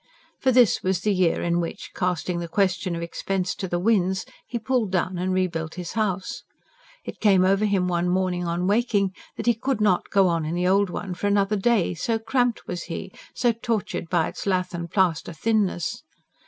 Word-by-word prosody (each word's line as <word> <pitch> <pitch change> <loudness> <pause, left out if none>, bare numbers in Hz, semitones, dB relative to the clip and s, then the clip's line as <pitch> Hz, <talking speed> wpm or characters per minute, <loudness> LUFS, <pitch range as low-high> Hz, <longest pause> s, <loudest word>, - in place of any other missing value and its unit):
For 260 - +3
this 245 -4 +4
was 185 -1 0
the 210 - +1
year 180 -3 +2
in 170 0 +1
which, 170 - -5
casting 180 -1 -1
the 170 - -4
question 185 -1 0
of 170 - -4
expense 185 +2 -2
to 190 - -5
the 175 - -1
winds, 190 -1 +1 0.2
he 240 - -3
pulled 230 -3 0
down 185 -1 0
and 185 +1 -1
rebuilt 170 -4 -1
his 180 -2 -5
house. 195 -4 -2 0.6
It - - -7
came 190 -3 +4
over 195 +3 +3
him 195 -3 +1
one 175 0 0
morning 180 -1 0
on 170 +1 -1
waking 205 -2 +2 0.2
that - - -4
he 240 - +5
could 250 +2 -2
not 200 -4 +2
go 195 -2 +4
on 165 -2 0
in 155 +2 -2
the 180 +1 +1
old 195 +1 +3
one 185 +1 -4
for 180 +3 -2
another 200 0 +2
day, 205 -3 +2
so 225 +7 -1
cramped 240 +1 0
was 175 - -5
he, 190 +2 -6 0.2
so 240 - +3
tortured 225 -7 -3
by 170 -3 +2
its - - -7
lath 185 -2 0
and 170 0 -4
plaster 175 -3 +1
thinness. 200 -3 0
185 Hz, 200 wpm, -24 LUFS, 175-210 Hz, 0.6 s, he